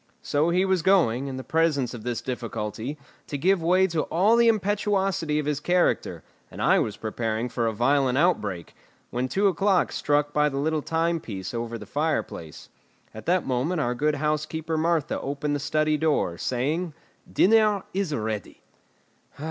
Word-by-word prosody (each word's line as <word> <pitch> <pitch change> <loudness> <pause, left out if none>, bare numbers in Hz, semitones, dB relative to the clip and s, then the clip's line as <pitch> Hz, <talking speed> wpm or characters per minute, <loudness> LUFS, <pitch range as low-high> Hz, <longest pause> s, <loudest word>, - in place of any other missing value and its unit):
So 150 +3 +1
he 180 +2 +2
was 190 -2 +1
going, 155 -9 +3
in 130 -1 -5
the 130 - -6
presence 155 -6 +1
of 120 - -7
this 120 -1 -3
difficulty, 115 +1 -4 0.3
to 145 - -3
give 185 +5 +2
way 180 +3 +4
to 165 -4 0
all 200 +7 +3
the 235 0 +4
impetuosity 195 -6 +1
of 150 - -1
his 150 -1 -1
character, 180 +3 0 0.3
and - - -11
I - - +4
was 105 - -2
preparing 115 +1 -2
for 115 -1 -1
a - - +1
violent 130 +3 +2
outbreak, 105 - 0 0.4
when 125 +2 -1
two 200 +9 +2
o'clock 195 -1 +2
struck 145 0 0
by 150 0 +3
the 135 - -5
little 155 +2 0
timepiece 160 - -2
over 115 0 -3
the 105 - -10
fireplace. 145 - -3 0.5
At 110 - -10
that 180 +1 +2
moment 135 +7 -1
our 125 -4 0
good 150 +4 0
housekeeper 155 +2 -2
Martha 160 -2 0
opened 145 +1 -2
the - - -2
study 155 +1 +1
door, 150 - +1
saying: 150 +7 -1 0.4
"Dinner 210 -1 +4
is 190 -3 -1
ready!" 110 -6 -4
150 Hz, 165 wpm, -25 LUFS, 125-175 Hz, 0.5 s, way